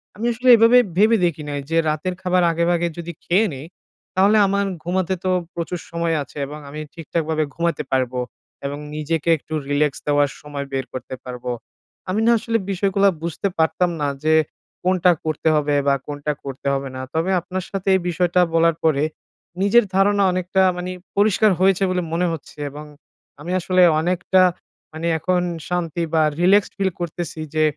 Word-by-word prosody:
আমি 215 Hz, +4 st, -4 dB
আসলে 245 Hz, +2 st, -3 dB
এইভাবে 230 Hz, +2 st, +6 dB, 0.2 s
ভেবে 220 Hz, +3 st, +5 dB
দেখি 160 Hz, -3 st, -2 dB
নাই 145 Hz, 0 st, -3 dB
যে 165 Hz, -, +1 dB
রাতের 155 Hz, +4 st, -2 dB
খাবার 180 Hz, -1 st, +2 dB
আগেভাগে 170 Hz, +1 st, +1 dB
যদি 170 Hz, 0 st, -5 dB
খেয়ে 195 Hz, +6 st, +3 dB
নিই, 135 Hz, +2 st, -8 dB, 0.5 s
তাহলে 200 Hz, +3 st, +4 dB
আমার 200 Hz, +1 st, +1 dB, 0.2 s
ঘুমাতে 185 Hz, +1 st, 0 dB
তো 185 Hz, -, 0 dB, 0.2 s
প্রচুর 170 Hz, +1 st, -4 dB
সময় 170 Hz, -1 st, 0 dB
আছে 145 Hz, -, -16 dB
এবং 150 Hz, +2 st, -8 dB
আমি 150 Hz, +2 st, -7 dB
ঠিকঠাকভাবে 160 Hz, -1 st, -2 dB
ঘুমাইতে 170 Hz, 0 st, -1 dB
পারবো। 130 Hz, -1 st, 0 dB, 0.5 s
এবং 140 Hz, +1 st, -3 dB, 0.2 s
নিজেকে 155 Hz, +1 st, -2 dB
একটু 155 Hz, -, -11 dB, 0.2 s
relax 145 Hz, 0 st, +2 dB
দেওয়ার 145 Hz, -1 st, +3 dB
সময় 145 Hz, -1 st, -6 dB
বের 135 Hz, -1 st, -1 dB
করতে 130 Hz, 0 st, -6 dB
পারবো। 125 Hz, -1 st, -5 dB, 0.6 s
আমি 195 Hz, -, 0 dB
না -, -, +6 dB
আসলে 230 Hz, +1 st, 0 dB
বিষয়গুলো 195 Hz, +1 st, +2 dB, 0.2 s
বুঝতে 170 Hz, +4 st, -2 dB
পারতাম 165 Hz, +2 st, +2 dB
না 145 Hz, -, +1 dB, 0.2 s
যে, 155 Hz, 0 st, +3 dB, 0.5 s
কোনটা 180 Hz, -1 st, +3 dB
করতে 155 Hz, 0 st, -2 dB
হবে 145 Hz, -1 st, +1 dB
বা 140 Hz, -, +4 dB
কোনটা 145 Hz, 0 st, -3 dB
করতে 135 Hz, 0 st, -6 dB
হবে 135 Hz, 0 st, -2 dB
না। 130 Hz, -, -5 dB
তবে 165 Hz, +4 st, 0 dB
আপনার 185 Hz, +2 st, -5 dB
সাথে 195 Hz, -1 st, -5 dB
এই 190 Hz, -, +1 dB
বিষয়টা 175 Hz, +1 st, +2 dB
বলার 165 Hz, 0 st, +3 dB
পরে, 150 Hz, -3 st, +2 dB, 0.6 s
নিজের 210 Hz, +3 st, +5 dB
ধারণা 200 Hz, +1 st, +3 dB
অনেকটা 185 Hz, +1 st, 0 dB, 0.2 s
মানে 180 Hz, +1 st, -4 dB, 0.3 s
পরিষ্কার 210 Hz, +1 st, +4 dB
হয়েছে 195 Hz, 0 st, +3 dB
বলে 185 Hz, 0 st, 0 dB
মনে 175 Hz, +2 st, +1 dB
হচ্ছে। 160 Hz, -1 st, -8 dB
এবং 150 Hz, +2 st, -9 dB, 0.6 s
আমি 170 Hz, +4 st, -5 dB
আসলে 185 Hz, +1 st, +2 dB, 0.2 s
অনেকটা 180 Hz, +2 st, +2 dB, 0.5 s
মানে 160 Hz, +2 st, -3 dB
এখন 180 Hz, +3 st, +1 dB, 0.3 s
শান্তি 175 Hz, -1 st, -1 dB
বা 160 Hz, -, +4 dB, 0.2 s
relaxed 195 Hz, +3 st, +4 dB
ফিল 195 Hz, -1 st, +1 dB
করতেছি 170 Hz, -1 st, -5 dB, 0.2 s
যে, 155 Hz, -, +3 dB
170 Hz, 170 wpm, -21 LUFS, 150-185 Hz, 0.6 s, এইভাবে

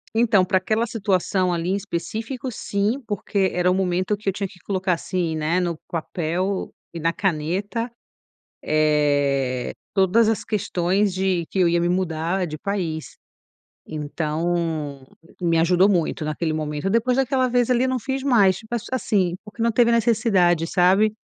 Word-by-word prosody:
Então, 220 Hz, -5 st, +4 dB
pra 190 Hz, 0 st, +2 dB
aquela 215 Hz, +5 st, 0 dB
situação 190 Hz, -4 st, 0 dB
ali 170 Hz, 0 st, -1 dB
em -, -, +2 dB
específico, 220 Hz, -, -4 dB
sim, 210 Hz, +4 st, -1 dB
porque 200 Hz, -2 st, 0 dB
era 180 Hz, 0 st, +1 dB
o -, -, +3 dB
momento 185 Hz, +1 st, 0 dB
que 205 Hz, -1 st, -3 dB
eu -, -, -1 dB
tinha 200 Hz, +1 st, -3 dB
que 180 Hz, -, -17 dB
colocar 190 Hz, 0 st, -1 dB
assim, 170 Hz, -1 st, -2 dB
né, 155 Hz, +3 st, 0 dB
no 175 Hz, -2 st, -1 dB
papel 175 Hz, +3 st, -2 dB, 0.2 s
e 170 Hz, -, -5 dB
na 165 Hz, +1 st, +1 dB
caneta, 195 Hz, +7 st, -2 dB, 0.7 s
eh, 145 Hz, -4 st, +1 dB, 0.2 s
todas 200 Hz, +4 st, +4 dB
as 225 Hz, -, -1 dB
questões 195 Hz, -1 st, 0 dB
de 185 Hz, -2 st, 0 dB
que 195 Hz, -, -2 dB
eu 180 Hz, -, +5 dB
ia 170 Hz, 0 st, +2 dB
me 175 Hz, -, +1 dB
mudar 175 Hz, 0 st, -1 dB
de 155 Hz, -1 st, -6 dB
país. 170 Hz, -4 st, -4 dB, 0.7 s
Então 155 Hz, -1 st, -2 dB, 0.3 s
me 170 Hz, -2 st, +2 dB
ajudou 180 Hz, +4 st, +4 dB
muito 170 Hz, -4 st, 0 dB
naquele 155 Hz, +1 st, -1 dB
momento. 155 Hz, +3 st, -2 dB
Depois 230 Hz, +3 st, +2 dB
daquela 265 Hz, -1 st, +2 dB
vez 245 Hz, 0 st, +1 dB
ali 250 Hz, 0 st, +3 dB
eu -, -, +1 dB
não 260 Hz, 0 st, 0 dB
fiz 265 Hz, +3 st, -3 dB
mais, 205 Hz, -9 st, +4 dB
tipo, 220 Hz, +1 st, -7 dB
a -, -, +1 dB
assim, 195 Hz, -8 st, +1 dB
porque 215 Hz, +2 st, -6 dB
não 230 Hz, 0 st, +2 dB
teve 235 Hz, +1 st, +4 dB
necessidade, 210 Hz, -8 st, +3 dB
sabe. 190 Hz, +5 st, +3 dB
185 Hz, 165 wpm, -23 LUFS, 165-215 Hz, 0.7 s, eu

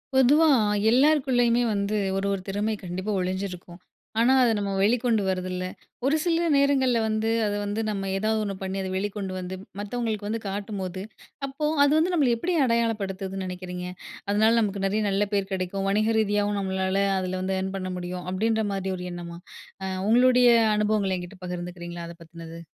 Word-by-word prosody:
பொதுவா 285 Hz, +5 st, +5 dB, 0.5 s
எல்லாருக்குள்ளேயுமே 250 Hz, -3 st, +3 dB
வந்து 200 Hz, +1 st, -1 dB, 0.2 s
ஒரு, 195 Hz, -, -1 dB
ஒரு 195 Hz, -, -3 dB
திறமை 205 Hz, +3 st, -1 dB
கண்டிப்பா 185 Hz, +4 st, -4 dB
ஒழிஞ்சிருக்கும். 180 Hz, -1 st, -4 dB, 0.4 s
ஆனா, 240 Hz, +3 st, +5 dB
அதை 240 Hz, -, +4 dB
நம்ம 200 Hz, -1 st, -2 dB
வெளிக்கொண்டு 230 Hz, 0 st, +2 dB
வரதில்ல. 185 Hz, -1 st, -2 dB, 0.4 s
ஒரு 280 Hz, +3 st, +3 dB
சில 340 Hz, -1 st, +1 dB
நேரங்கள்ல 270 Hz, -4 st, +3 dB
வந்து 220 Hz, +1 st, 0 dB, 0.2 s
அதை 205 Hz, 0 st, -1 dB
வந்து 205 Hz, +2 st, -2 dB
நம்ம 195 Hz, -2 st, -2 dB
ஏதாவது 220 Hz, +2 st, 0 dB
ஒண்ணு 200 Hz, -2 st, -3 dB
பண்ணி 190 Hz, 0 st, -3 dB
அதை 190 Hz, -, -3 dB
வெளிக்கொண்டு 195 Hz, 0 st, -3 dB
வந்து 185 Hz, +1 st, -5 dB, 0.2 s
மத்தவங்களுக்கு 215 Hz, 0 st, -3 dB
வந்து 225 Hz, +1 st, -2 dB
காட்டும்போது, 195 Hz, -2 st, -4 dB, 0.5 s
அப்போ 275 Hz, +3 st, -4 dB, 0.2 s
அது 285 Hz, -, +4 dB
வந்து 340 Hz, +3 st, +2 dB
நம்மள 285 Hz, -8 st, +3 dB
எப்படி 350 Hz, +9 st, -1 dB
அடையாளப்படுத்துதுன்னு 195 Hz, -5 st, -1 dB
நினைக்கிறீங்க. 180 Hz, 0 st, -6 dB, 0.5 s
அதனால, 215 Hz, +2 st, +4 dB
நமக்கு 200 Hz, -2 st, -1 dB
நிறைய 205 Hz, +3 st, +1 dB
நல்ல 200 Hz, +1 st, +1 dB
பேர் 200 Hz, -1 st, 0 dB
கிடைக்கும். 190 Hz, +1 st, -2 dB
வணிக 215 Hz, +3 st, +2 dB
ரீதியாவும் 205 Hz, -1 st, +1 dB
நம்மளால 190 Hz, 0 st, 0 dB, 0.2 s
அதில 185 Hz, 0 st, -3 dB
வந்து 190 Hz, +1 st, -1 dB
அர்ன் 190 Hz, 0 st, -3 dB
பண்ண 185 Hz, -1 st, -4 dB
முடியும். 180 Hz, 0 st, -5 dB
அப்படின்ற 220 Hz, +3 st, +1 dB
மாரி 190 Hz, -1 st, -2 dB
ஒரு 180 Hz, -, -6 dB
எண்ணமா, 170 Hz, -1 st, -7 dB, 0.5 s
அ -, -, -2 dB, 0.2 s
உங்களுடைய 250 Hz, +1 st, +5 dB, 0.3 s
அனுபவங்கள்ல 210 Hz, -3 st, +1 dB
என்கிட்ட 180 Hz, +2 st, -10 dB
பகிர்ந்துக்கிறீங்களா 175 Hz, -1 st, -6 dB
அதை 170 Hz, -, -11 dB
பத்துனது. 165 Hz, 0 st, -10 dB
200 Hz, 160 wpm, -26 LUFS, 185-225 Hz, 0.5 s, பொதுவா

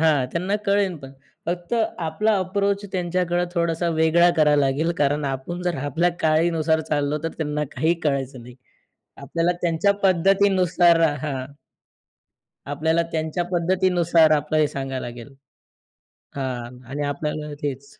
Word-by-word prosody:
हां, 150 Hz, -5 st, +3 dB
त्यांना 185 Hz, +4 st, 0 dB
कळेल. 200 Hz, -3 st, +2 dB
पण 135 Hz, -3 st, -11 dB, 0.3 s
फक्त 175 Hz, +5 st, -3 dB, 0.2 s
आपला 205 Hz, +7 st, 0 dB
अप्रोच 200 Hz, +2 st, -1 dB
त्यांच्याकडे 175 Hz, -1 st, 0 dB
थोडासा 170 Hz, 0 st, 0 dB
वेगळा 160 Hz, +2 st, +4 dB
करावा 150 Hz, -2 st, +4 dB
लागेल 145 Hz, +3 st, +1 dB
कारण 145 Hz, +1 st, +1 dB
आपण 140 Hz, +6 st, -4 dB
जर 175 Hz, -1 st, -1 dB
आपल्या 160 Hz, +5 st, +1 dB
काळानुसार 160 Hz, 0 st, +2 dB
चाललो, 150 Hz, -1 st, -1 dB
तर -, -, +1 dB
त्यांना 150 Hz, -1 st, -1 dB
काही 160 Hz, +6 st, +1 dB
कळायचं 135 Hz, -4 st, -2 dB
नाही. 125 Hz, +1 st, -12 dB, 0.6 s
आपल्याला 165 Hz, +5 st, -1 dB
त्यांच्या 170 Hz, +3 st, +2 dB
पद्धतीनुसार 185 Hz, -2 st, +4 dB, 0.2 s
हां. 135 Hz, -4 st, -3 dB, 1.3 s
आपल्याला 160 Hz, +3 st, +1 dB
त्यांच्या 160 Hz, +2 st, -1 dB
पद्धतीनुसार 175 Hz, -2 st, +3 dB
आपलं 150 Hz, +1 st, -2 dB
हे 155 Hz, -, +4 dB
सांगायला 135 Hz, -2 st, -4 dB
लागेल 120 Hz, +3 st, -10 dB, 1.0 s
हां. 125 Hz, -2 st, -5 dB
आणि 145 Hz, +2 st, -3 dB
आपल्याला 150 Hz, +1 st, -3 dB
तेच, 140 Hz, 0 st, -6 dB
160 Hz, 125 wpm, -23 LUFS, 145-175 Hz, 1.3 s, वेगळा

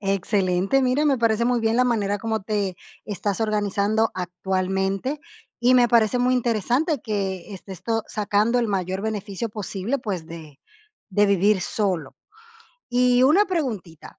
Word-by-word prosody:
Excelente. 195 Hz, +3 st, +1 dB
Mira, 255 Hz, +4 st, +2 dB
me 275 Hz, -, +3 dB
parece 230 Hz, 0 st, +2 dB
muy 245 Hz, -1 st, +1 dB
bien 225 Hz, 0 st, +1 dB
la 250 Hz, -, +4 dB
manera 205 Hz, -4 st, 0 dB
como 220 Hz, 0 st, -2 dB
te 200 Hz, -3 st, -2 dB, 0.3 s
estás 205 Hz, 0 st, -3 dB
organizando 215 Hz, 0 st, +1 dB
actualmente, 190 Hz, -, -2 dB, 0.4 s
y 245 Hz, +2 st, +4 dB
me 245 Hz, -1 st, +5 dB
parece 230 Hz, +1 st, +3 dB
muy 250 Hz, +1 st, +2 dB
interesante 245 Hz, -, 0 dB
que 195 Hz, -3 st, -3 dB
estés 190 Hz, -1 st, -10 dB
to 225 Hz, +1 st, -1 dB
sacando 215 Hz, +3 st, +1 dB
el 235 Hz, -2 st, 0 dB
mayor 190 Hz, -1 st, -2 dB
beneficio 215 Hz, 0 st, -3 dB
posible, 210 Hz, +4 st, -3 dB
pues, 190 Hz, -9 st, -4 dB
de 160 Hz, -4 st, -11 dB, 0.5 s
de 205 Hz, +1 st, +3 dB
vivir 200 Hz, 0 st, +3 dB
solo. 180 Hz, -7 st, -2 dB, 0.7 s
Y 250 Hz, 0 st, +3 dB
una 325 Hz, +11 st, +5 dB
preguntita, 225 Hz, -, -4 dB
210 Hz, 145 wpm, -23 LUFS, 190-240 Hz, 0.7 s, me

